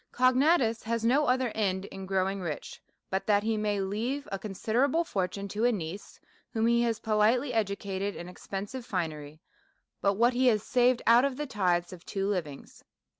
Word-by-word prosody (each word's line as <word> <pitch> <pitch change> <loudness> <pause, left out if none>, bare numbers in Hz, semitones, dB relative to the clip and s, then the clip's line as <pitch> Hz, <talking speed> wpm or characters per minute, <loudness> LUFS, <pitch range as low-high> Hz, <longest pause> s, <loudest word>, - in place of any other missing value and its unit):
Cognatus 255 -1 +3
has 230 0 -2
no 280 +5 +3
other 255 0 +2
end 190 -3 -1
in 195 -1 -8
growing 195 0 0
rich, 160 -5 -6 0.3
but 190 +1 -2
that 205 -1 +3
he 225 0 0
may 210 -1 0
leave 225 +9 -2
a 195 - -3
considerable 240 - 0
fortune 200 - -3
to 210 +3 -2
a 245 - +5
niece, 190 -1 -6 0.3
whom 225 -1 +1
he 235 0 +3
has 230 -2 +1
politely 225 +5 +2
educated 200 -2 -2
in 175 - -7
expensive 200 +7 -6
finery 155 -6 -4 0.6
by 200 - +3
what 235 +5 +3
he 255 +1 +2
has 215 -4 +3
saved 250 -1 +2
out 235 +2 +6
of 275 -2 0
the 295 - -2
tithes 180 -8 0
of 175 -2 -11
two 195 0 -2
livings. 165 -9 -4
210 Hz, 175 wpm, -29 LUFS, 195-245 Hz, 0.6 s, out